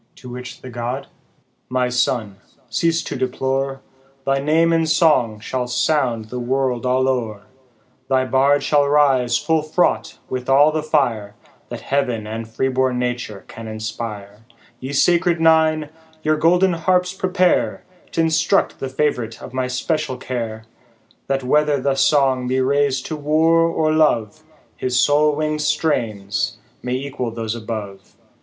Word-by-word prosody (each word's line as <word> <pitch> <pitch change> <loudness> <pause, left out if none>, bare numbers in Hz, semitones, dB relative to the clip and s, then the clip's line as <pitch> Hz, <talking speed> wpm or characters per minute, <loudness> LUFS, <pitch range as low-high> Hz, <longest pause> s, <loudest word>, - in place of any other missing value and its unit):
" - - -42
To 125 - -12
which 125 0 -8
the 130 - -9
god 120 +3 -4 0.3
" - - -44
My 125 - +2
son, 125 -5 -1 0.3
cease 165 +8 +1
to - - -5
deplore, 135 +1 -2 0.4
Thy 135 0 +1
name 160 +4 +2
in 165 -1 +2
song 155 - +3
shall 125 +3 -3
sound 125 -2 0
the 125 - -4
world 125 0 -1
all 130 +1 +2
o'er; 115 -6 -2 0.7
Thy 130 -1 +2
bard 135 +2 +3
shall 145 -1 +3
rise 135 -5 +3
full 160 -1 +1
fraught 155 +4 0
with 130 0 -4
all 145 +3 +5
the 155 0 -1
fire, 120 -10 0 0.3
That - - -6
heav'n 125 -6 -1
and 110 +1 -5
free 115 +4 -1
born 130 -1 0
nature 125 -5 -3
can 115 0 -9
inspire: 110 -2 -6 0.4
Ye 130 +2 -6
sacred 170 +3 +2
Nine, 160 -2 +3 0.3
your 155 0 +2
golden 180 +4 +3
harps 180 +2 +1
prepare, 185 -1 +1 0.3
T' 165 - 0
instruct 165 +4 +1
the 135 - -4
fav'rite 130 -5 -1
of 130 - -10
my 130 -1 -1
special 130 +1 -2
care, 115 -3 -5 0.6
That 135 -1 -1
whether 150 +2 +2
the 135 +1 +1
song 135 -2 +2
be 130 +1 0
rais'd 135 0 +1
to 160 - -4
war 155 +3 +2
or 155 -1 +1
love, 120 -9 +1 0.3
His 125 -1 0
soul 150 +2 +3
wing'd 155 0 -1
strains 120 -10 -1 0.2
may 125 - -3
equal 130 -2 -4
those 115 -1 -4
above. 105 -4 -7
130 Hz, 150 wpm, -20 LUFS, 120-155 Hz, 0.7 s, all